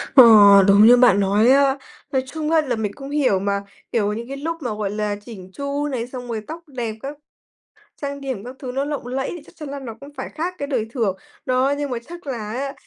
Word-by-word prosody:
Ờ, 260 - +11 0.4
đúng 200 +2 +7
như 245 +2 +8
bạn 245 -4 +5
nói 205 +4 +3
á. 275 0 +4 0.4
Nói 260 -1 +1
chung 310 +2 -3
á, 325 -1 +5
là 260 -5 -2
mình 215 -2 -2
cũng 275 0 -9
hiểu 280 -9 +2
mà, 200 +1 -1 0.3
kiểu, 210 -3 +1
những 230 +2 -6
cái 275 +1 -6
lúc 325 +4 -3
mà, 240 -5 -3
gọi 210 -2 -2
là, 210 0 -2
chỉn 190 -6 -10
chu 280 +3 -3
này, 245 -4 -3
xong 250 -1 -8
rồi 225 -2 -3
tóc 325 +2 -6
đẹp 240 -6 -4
các 285 +2 -6 0.9
trang 280 0 -4
điểm 260 -7 -5
các 250 +2 -9
thứ 255 -3 -6
nó 270 +2 -1
lộng 290 -4 -4
lẫy, 265 +2 -2
thì 345 - -8
chắc - - -17
chắn 300 -3 -8
là 280 +1 -5
nó 235 -4 -7
cũng 280 - -10
phải 260 - -5
khác 340 +4 -3
cái 285 - -3
đời 245 -6 -1
thường. 220 -7 0 0.3
Đó, 255 +2 +2
nhưng 290 -1 -3
mà 245 - -2
chắc 345 -1 -10
là 230 -6 -4
á, 275 +3 -3
260 Hz, 245 wpm, -21 LUFS, 220-280 Hz, 0.9 s, Ờ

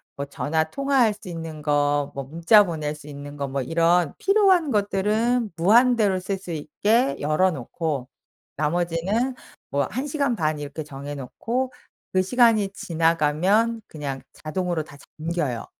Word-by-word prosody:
뭐 140 - -4
전화 155 +3 -1
통화할 270 - +2
수 200 - -14
있는 165 -3 -6
거 145 -1 +1
뭐 140 - -3
문자 170 - +5
보낼 155 -4 -3
수 150 0 -14
있는 145 0 -8
거 140 -1 -3
뭐 135 0 -2
이런 165 +3 +2
필요한 385 -7 +4
것들은 215 +3 +1
무한대로 215 +1 +4
쓸 195 +1 -2
수 180 -2 -9
있게 210 - +1
열어 155 +6 +2
놓고 140 -1 -3 0.5
나머지는 175 - 0 0.3
뭐 140 0 +1
1 260 +5 -3
시간 280 -4 0
반 155 -1 0
이렇게 145 +2 -6
정해 145 0 -7
놓고 235 - -3 0.4
그 185 - +4
시간이 225 -1 +3
지나가면 180 +4 +1
그냥 140 -3 -5
자동으로 170 0 -2
다 140 - -14 0.2
잠겨요. 155 -7 -2
170 Hz, 275 characters per minute, -24 LUFS, 150-220 Hz, 0.5 s, 문자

